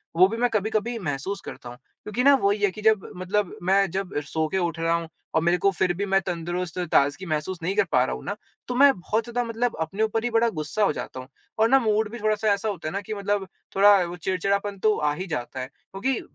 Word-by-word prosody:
वो 185 +3 +7
भी 225 +3 -4
मैं 245 +1 +2
कभी-कभी 220 +2 -1
महसूस 175 +4 -3
करता 120 - -8
हूँ। 120 - -10
क्योंकि 210 - -5
ना 280 +1 +7
वो 200 - +3
ही 205 - -1
है 200 - +5
कि 210 - -9
जब 215 -3 +2
मतलब 190 +1 -1
मैं 195 +1 +3
जब 190 0 -3
सो 160 +2 -1
के 175 - -2
उठ 170 -3 -1
रहा 165 0 +1
हूँ 170 -1 -3 0.3
और 160 - +4
मेरे 170 +2 +3
को 195 +2 +2
फिर 185 -1 +1
भी 200 +4 -2
मैं 195 0 +2
तंदुरुस्त 175 -1 -4
और 180 - -1
ताज़गी 145 +5 +2
महसूस 155 +3 -2
नहीं 190 +4 -1
कर 205 - +4
पा 125 - +4
रहा - - -3
हूँ - - -9
ना 200 - -3 0.3
तो 250 - -3
मैं 280 +2 +7
बहुत 215 +5 -1
ज़्यादा 245 +1 -2
मतलब 230 +1 -1
अपने 195 +7 -1
ऊपर 220 +1 0
ही 245 - 0
बड़ा 230 +1 +3
गुस्सा 155 +8 -1
हो 195 - +3
जाता 130 - -6
हूँ 130 - -9 0.3
और 225 +1 +4
ना 270 +2 +6
मूड 215 -2 +1
भी 240 - -7
थोड़ा-सा 215 0 0
ऐसा 200 +2 -2
होता 180 -6 -4
है - - -2
ना 200 - -2
कि 215 +2 -6
मतलब 200 -1 -1 0.3
थोड़ा 205 +1 +7
वो 175 0 -5
चिड़चिड़ापन 195 +3 -1
तो 215 +1 +3
आ 150 -1 +1
ही 185 +4 -5
जाता 130 -5 -4
है। 130 - -4
क्योंकि 200 - -4
195 Hz, 260 wpm, -25 LUFS, 170-215 Hz, 0.3 s, वो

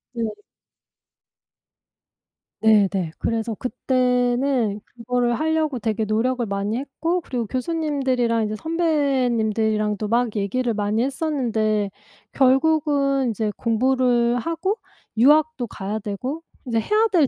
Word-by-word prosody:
네. 230 -1 -1 2.3
네네. 200 -6 +3
그래서 225 0 -2
그때는 250 -2 0
그거를 245 0 -1
하려고 315 -4 0
되게 220 0 -1
노력을 235 +3 0
많이 200 +2 -2
했고 320 +6 -2
그리고 245 -7 -3
교수님들이랑 260 -5 0
이제 215 0 -3
선배님들이랑도 230 - 0
막 235 0 +1
얘기를 235 +5 0
많이 210 +2 0
했었는데 230 -8 0 0.4
결국은 275 -1 +2
이제 215 0 -2
공부를 245 0 +2
하고 335 - -2 0.4
유학도 295 +1 +4
가야 205 +1 -4
되고 250 +10 -4 0.2
이제 230 -3 0
해야 425 - +2
될 325 -7 +4
245 Hz, 255 characters per minute, -22 LUFS, 220-275 Hz, 2.3 s, 유학도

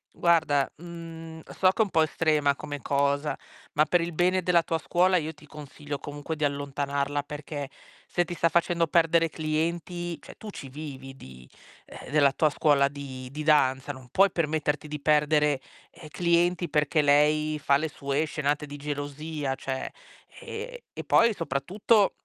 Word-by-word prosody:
Guarda, 160 -5 +3
mhmm, 165 -1 -9 0.2
so 185 - +6
che 190 - +1
è - - +7
un 205 - -5
po' 160 - +4
estrema 155 -2 +2
come 145 0 -7
cosa, 140 +1 0 0.4
ma 155 +1 +4
per 175 +3 +2
il 170 +1 -3
bene 180 +3 +2
della 175 -1 +3
tua 165 0 -1
scuola 180 +3 +3
io 160 0 -3
ti 150 0 -18
consiglio 145 -1 -8
comunque 145 +2 -6
di 155 - -4
allontanarla 140 0 -1
perché, 145 -1 -6 0.4
se 175 - 0
ti 175 - -6
sta 165 -1 +2
facendo 170 0 +2
perdere 165 0 +3
clienti 170 +2 -2
cioè - - -12
tu 215 - -9
ci 140 -8 -8
vivi 135 -2 -8
di 65 - -13 0.6
uhm, - - -10
della 140 -1 +4
tua 155 +2 +2
scuola 145 -2 +3
di 135 -2 -8
di 150 +3 -6
danza, 145 -3 +3
non 130 -2 -13
puoi 195 +7 +4
permetterti 155 -2 -1
di 150 0 -5
perdere, 150 -1 +2 0.3
ehm, 155 - -12
clienti 175 +1 +1
perché 150 +1 +2
lei 150 +1 +3
fa 140 -2 +4
le 155 +3 -2
sue 140 0 -2
scenate 150 -1 -1
di 145 0 -9
gelosia, 145 0 -4
cioè; 135 0 -4 0.5
ehm, - - -6
e - - -7
poi 230 -2 +4
soprattutto 195 - +1
150 Hz, 165 wpm, -27 LUFS, 145-170 Hz, 0.6 s, è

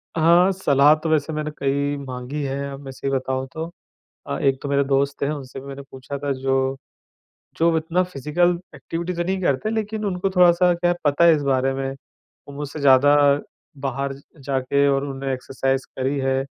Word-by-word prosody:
हाँ, 170 +3 +5
सलाह 150 -6 +4
तो 155 +1 -4
वैसे 155 0 +1
मैंने 155 0 -3
कई 140 +1 0
माँगी 130 +3 -5
है, 140 +1 -3
अब 135 - -8
मैं 135 - -8
सही 130 +1 -4
बताऊँ 130 0 -1
तो। 160 0 -4 0.6
अ, - - -2
एक 135 -1 +2
तो 140 - -4
मेरे 140 0 +3
दोस्त 140 +1 0
हैं, 140 - +1
उनसे 135 -3 -7
भी 135 - -12
मैंने 140 0 -7
पूछा 135 +2 -7
था, 140 0 -2
जो 135 0 0 0.8
जो 165 0 +3
इतना 165 +3 +1
फिज़िकल 175 +2 0 0.2
एक्टिविटी 170 +2 -4
तो 175 - -1
नहीं 190 +2 -2
करते, 140 +5 0
लेकिन 220 -1 -2
उनको 195 -1 -1
थोड़ा-सा 180 0 +5
क्या 175 0 +1
है, 175 - 0
पता 145 +3 +3
है 170 -1 +7
इस 150 - -1
बारे 135 -1 +1
में। 135 0 -2
वो 135 +1 -18
मुझसे 145 +1 -6
ज़्यादा 140 +1 +6 0.7
बाहर 135 0 -2
ज 140 - -15 0.2
जाके 140 +1 +1
और 135 0 +1
उन्होंने 135 -1 -4
एक्सरसाइज़ 135 +1 -2
करी 135 +2 0
है, 135 0 0
140 Hz, 190 wpm, -22 LUFS, 135-165 Hz, 0.8 s, है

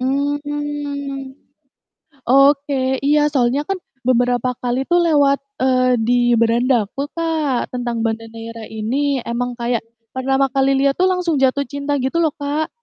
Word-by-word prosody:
Mmm. 285 0 -3 0.9
Oke, 275 0 +3
iya, 295 +1 +3
soalnya 260 0 +2
kan 390 - 0 0.3
beberapa 245 0 +2
kali 250 +1 -1
tuh 350 0 +4
lewat, 285 -4 +3 0.2
eee, 255 -1 +3
di 245 +2 +2 0.2
beranda 235 0 +2
aku, 275 +6 -4
Kak, 320 -6 -1
tentang 240 -2 -2
Banda 225 0 -2
Neira 230 0 -8
ini, 260 +6 -1
emang 245 +1 -3
kayak 235 -1 0 0.3
pertama 270 +1 +1
kali 270 0 +2
lihat 275 0 +2
tuh, 370 - +4
langsung 360 -4 0
jatuh 270 +1 +2
cinta, 285 +1 -2
gitu 265 +6 -1
loh, 315 -3 +1
Kak, 295 +2 -2
270 Hz, 140 wpm, -19 LUFS, 245-290 Hz, 0.9 s, tuh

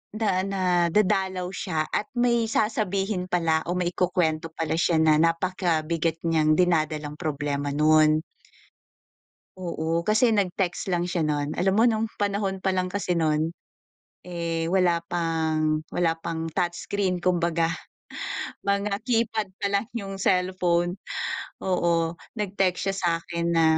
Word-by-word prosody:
na 215 -1 0 0.2
na 195 -1 -2 0.3
dadalaw 190 -1 +1
siya 160 -4 -2
at - - -1
may 240 -1 +2
sasabihin 200 -3 0
pala 165 -3 +2
o 175 - -1
may 180 -1 0
ikukuwento 170 -3 0
pala 165 0 -1
siya 170 -1 +2
na 155 -1 +5
napakabigat 165 -1 0
niyang 155 -2 +3
dinadalang 155 -4 0
problema 145 -3 -2
nun. 155 +1 +4 1.4
Oo. 170 -2 -2
Kasi 215 +3 +4
nag-text 190 -3 0
lang 175 - +1
siya 165 -3 0
nun. 145 0 -1
Alam 190 +2 +2
mo 220 - +4
nung 225 -1 +1
panahon 200 -2 -1
pa 190 - +2
lang 185 -1 0
kasi 180 -2 -1
nun, 155 0 +1 0.7
eh, 170 -2 -2
wala 175 -3 +2
pang 160 -2 0
wala 165 -2 +1
pang 165 0 -4
touchscreen, 180 +2 -1
kumbaga. 170 -2 +1 1.0
Mga 200 0 0
keypad 225 -3 +1 0.2
pa - - +2
lang 200 +2 +1
yung 195 -4 -5
cellphone, 180 -1 +1 0.6
oo. 170 -2 +1 0.2
Nag-text 195 -3 0
siya - - -3
sa'kin 170 -1 -1
na 165 - +4
175 Hz, 130 wpm, -25 LUFS, 165-195 Hz, 1.4 s, na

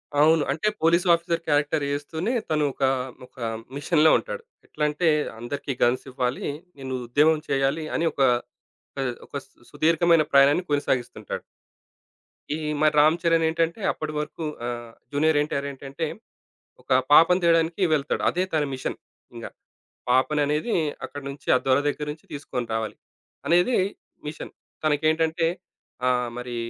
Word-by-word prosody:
అవును. 155 +1 +5
అంటే 160 +9 -1
police 170 +3 +3
officer 170 0 0
character 145 0 +1
చేస్తూనే, 160 - -2 0.2
తను 155 -1 +1
ఒక, 135 - -4 0.4
ఒక 125 - -27 0.4
మిషన్‌లో 155 +1 +4
ఉంటాడు. 485 -1 -6 0.2
ఎట్లంటే, 150 +3 -1 0.3
అందరికీ 140 +3 -4
గన్స్ 120 +3 +2
ఇవ్వాలి. 125 0 -2 0.3
నేను 130 -1 -6
ఉద్యమం 150 +5 +3
చేయాలి 140 +3 +1
అని 165 - +1
ఒక, 140 - -3 1.1
ఒక - - -25
సు - - -30 0.2
సుదీర్ఘమైన 165 +2 +3
ప్రయాణాన్ని 140 +5 +5
కొనసాగిస్తుంటాడు. 135 -4 -2 1.1
ఈ - - -3 0.2
మరి 155 -1 +4
'రామ్ 155 +3 +5
చరణ్' 165 -1 +3
ఏంటంటే 165 +4 0
అప్పడి 155 -1 -5
వరకు 150 +2 -5 0.2
ఆహ్, 120 -1 -5 0.2
'జూనియర్ 150 +1 +2
ఎన్టీఆర్' 140 -1 -2
ఏంటంటే 140 +4 -5 0.8
ఒక - - -23 0.2
పాపను 180 +4 +7
తేడానికి 165 +2 +2
వెళ్తాడు. 145 -1 -1
అదే 180 +2 0
తన 150 -2 +2
మిషన్ 130 - -4 0.4
ఇంగ. - - -7 0.6
పాపననేది 150 - +2 0.3
అక్కడినుంచి 140 0 -8
ఆ - - +3
దొర 130 0 +4
దగ్గరనుంచి 150 +1 -4
తీసుకొని 130 -4 -4
రావాలి 110 -1 -3 0.5
అనేది 175 +9 +4 0.5
మిషన్. 150 - -8 0.3
తనకేంటంటే 160 +2 +2 0.6
ఆహ్, 125 -1 +1
మరి 125 -1 -5
150 Hz, 125 wpm, -25 LUFS, 140-165 Hz, 1.1 s, పాపను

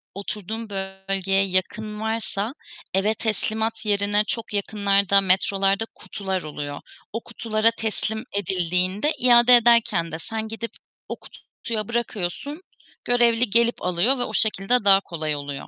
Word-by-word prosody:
oturduğum 215 +2 -5
bölgeye 195 0 -1
yakın 210 +3 -2
varsa 220 0 -2 0.4
eve 195 +3 +2
teslimat 220 0 -2
yerine 205 0 +2
çok 230 -4 -3
yakınlarda, 200 -1 +3
metrolarda 195 +2 +2
kutular 190 -2 -4
oluyor. 145 -1 -6 0.3
O 230 - -3
kutulara 225 -1 0
teslim 220 0 -3
edildiğinde 185 - 0
iade 245 0 +7
ederken 235 -8 +4
de, 160 - -5
sen 220 +5 -4
gidip 225 +1 -6 0.4
o - - -3
kutuya 215 -3 -7
bırakıyorsun, 235 - -3 0.4
görevli 240 -1 +3
gelip 235 +3 +2
alıyor 180 +9 +1
ve - - 0
o 220 - -5
şekilde 215 +2 +2
daha 195 -1 +7
kolay 155 -5 -3
oluyor. 145 -1 -6
210 Hz, 125 wpm, -23 LUFS, 190-225 Hz, 0.4 s, iade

